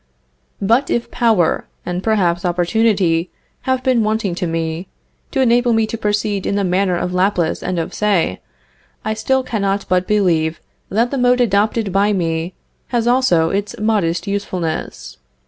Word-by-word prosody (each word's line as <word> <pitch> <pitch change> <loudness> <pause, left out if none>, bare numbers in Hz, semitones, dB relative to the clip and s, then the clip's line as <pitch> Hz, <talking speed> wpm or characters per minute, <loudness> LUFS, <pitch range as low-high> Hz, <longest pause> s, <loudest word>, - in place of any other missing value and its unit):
But 230 +7 +2
if 235 - -1
power, 220 -8 +2 0.2
and 180 0 -3
perhaps 190 -5 +1
opportunity, 180 -1 +1 0.4
have 260 -1 +1
been 255 -3 +3
wanting 215 -3 0
to 180 0 -2
me, 165 +1 -3 0.4
to 270 - 0
enable 240 -1 +3
me 225 0 +3
to 220 - -5
proceed 210 -2 -1
in 200 - 0
the 200 - +1
manner 185 0 +1
of 180 +1 -3
Laplace 180 -3 +1
and 185 - -2
of 165 - -3
Say, 195 - 0 0.6
I 215 - 0
still 265 +4 0
cannot 200 -5 -1
but 185 0 +1
believe 170 -6 +1 0.3
that 230 +5 +1
the 275 - -1
mode 250 0 +3
adopted 210 -2 +1
by 200 +2 +3
me 165 -1 -2 0.3
has 235 -2 0
also 240 -10 +3
its 200 +1 -2
modest 185 -6 0
usefulness. 190 -5 -4
200 Hz, 155 wpm, -18 LUFS, 175-225 Hz, 0.6 s, been